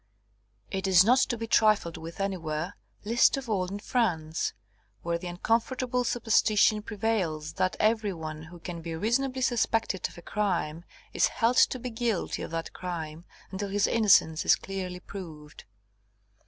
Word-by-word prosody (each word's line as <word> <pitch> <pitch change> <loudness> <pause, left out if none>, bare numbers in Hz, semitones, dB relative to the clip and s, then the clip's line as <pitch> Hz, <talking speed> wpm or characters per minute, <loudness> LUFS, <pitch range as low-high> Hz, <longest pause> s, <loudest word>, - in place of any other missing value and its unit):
It 195 0 -2
is 185 -1 +7
not 250 +5 +5
to 240 - +1
be 225 - -4
trifled 215 -6 +3
with 165 +2 -9
anywhere, 175 -3 -3 0.3
least 235 +5 +4
of 270 -2 -6
all 195 -5 0
in 195 +2 -5
France, 170 -9 -1 0.5
where 170 0 -1
the 180 - -7
uncomfortable 240 +7 0
superstition 220 -2 +3
prevails 195 -8 -2
that 185 +1 0
every 215 -1 +2
one 155 -3 -6
who 175 +2 -12
can 170 0 -7
be 165 0 -5
reasonably 255 +8 0
suspected 225 -5 0
of - - -16
a 175 - -11
crime 175 -5 -2 0.3
is - - +3
held 240 +1 +1
to - - +5
be 250 0 -6
guilty 225 -4 -2
of - - -5
that 165 0 -4
crime 165 -2 -6 0.3
until 200 +1 -4
his 200 +1 +2
innocence 200 -8 +4
is - - +5
clearly 185 -2 -5
proved. 160 -6 -10
195 Hz, 155 wpm, -28 LUFS, 170-225 Hz, 0.5 s, is